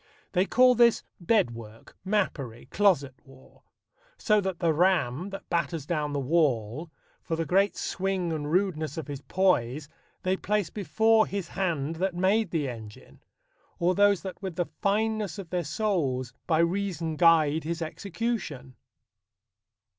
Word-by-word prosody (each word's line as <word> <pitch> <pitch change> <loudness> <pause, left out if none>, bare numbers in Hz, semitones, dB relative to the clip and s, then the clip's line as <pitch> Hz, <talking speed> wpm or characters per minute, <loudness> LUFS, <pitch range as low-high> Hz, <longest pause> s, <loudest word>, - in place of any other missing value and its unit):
They 185 +1 +2
call 255 0 +5
this 235 -1 +4 0.2
bed 175 - +2
work, 115 -1 -12
mappery, 165 - -2
closet 175 -10 +2
war: 135 -1 -19 0.6
So 215 -2 +2
that 190 -2 -3
the 165 -2 +1
ram, 170 -2 +1
that 195 - -8
batters 165 -3 -1
down 150 -2 -1
the 145 - -1
wall, 140 -1 0 0.3
For 165 - -3
the 165 0 -2
great 195 +4 +2
swing 190 -3 -2
and 150 -1 -3
rudeness 165 -5 0
of 160 - -4
his 145 -1 -6
poise, 150 -6 0 0.3
They 185 +1 +1
place 210 -3 -1
before 220 +4 +2
his 195 -4 -4
hand 165 -5 -2
that 185 +1 -1
made 190 +3 +2
the 155 -5 -1
engine, 110 -4 -10 0.6
Or 175 +2 +2
those 200 -1 +3
that 190 0 -7
with 190 -4 -5
the 175 - 0 0.2
fineness 210 -2 0
of 190 -5 -8
their 180 -1 0
souls 145 - -1
By 160 -1 +3
reason 170 -3 -1
guide 160 -2 +4
his 165 +1 -3
execution. 165 - -4
170 Hz, 145 wpm, -27 LUFS, 145-195 Hz, 0.6 s, call